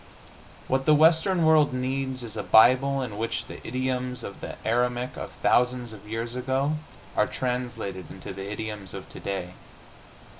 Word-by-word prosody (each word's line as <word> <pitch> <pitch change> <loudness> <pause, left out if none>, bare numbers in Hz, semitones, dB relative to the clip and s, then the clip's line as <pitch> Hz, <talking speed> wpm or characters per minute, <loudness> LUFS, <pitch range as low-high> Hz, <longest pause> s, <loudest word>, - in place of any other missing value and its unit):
What 135 +1 0
the 155 - +7
Western 165 +3 +4
World 155 -3 +5
needs 130 0 -2
is 115 -2 -7
a 105 - -2
Bible 130 +6 +5
in 110 -4 -6
which 115 +1 -2
the - - -9
idioms 125 -1 -2
of 100 - -8
the - - -6
Aramaic 125 +2 0
of - - -6
thousands 125 -1 +2
of 105 0 -12
years 115 +2 -3
ago 130 +4 0 0.4
are - - +3
translated 120 -8 -3
into - - -8
the 95 +1 -6
idioms 105 -3 -5
of - - -7
today. 90 -2 -4
125 Hz, 155 wpm, -26 LUFS, 110-130 Hz, 0.4 s, the